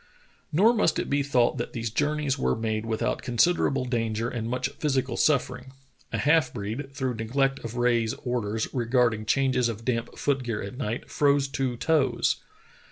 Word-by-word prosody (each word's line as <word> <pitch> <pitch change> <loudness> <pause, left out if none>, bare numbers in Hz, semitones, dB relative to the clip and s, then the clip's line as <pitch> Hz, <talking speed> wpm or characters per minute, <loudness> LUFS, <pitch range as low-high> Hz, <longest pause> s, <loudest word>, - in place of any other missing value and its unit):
Nor 205 +10 +5
must 215 -8 +2
it - - -3
be 140 0 +2
thought 125 -4 +2
that - - -4
these 115 -2 -3
journeys 150 +1 0
were 140 - 0
made 110 0 -2
without 115 +2 -1
considerable 135 +1 +2
danger 115 -2 -1
and 115 -2 -4
much 125 +1 -1
physical 135 -4 0
suffering. 130 -3 0 0.4
A - - -1
half 150 -3 +3
breed, 120 +6 -5
through 130 -2 -2
neglect 135 +4 0
of 115 0 -7
Rae's 120 -2 +1
orders 115 -3 -1
regarding 120 -3 +1
changes 130 -1 +2
of 115 0 -6
damp 115 -2 -2
foot 140 -2 0
gear 115 -4 -3
at 100 +4 -7
night, 120 -3 -4
froze 140 -1 +3
two 135 -3 -2
toes. 135 -5 +2
125 Hz, 165 wpm, -26 LUFS, 115-140 Hz, 0.4 s, Nor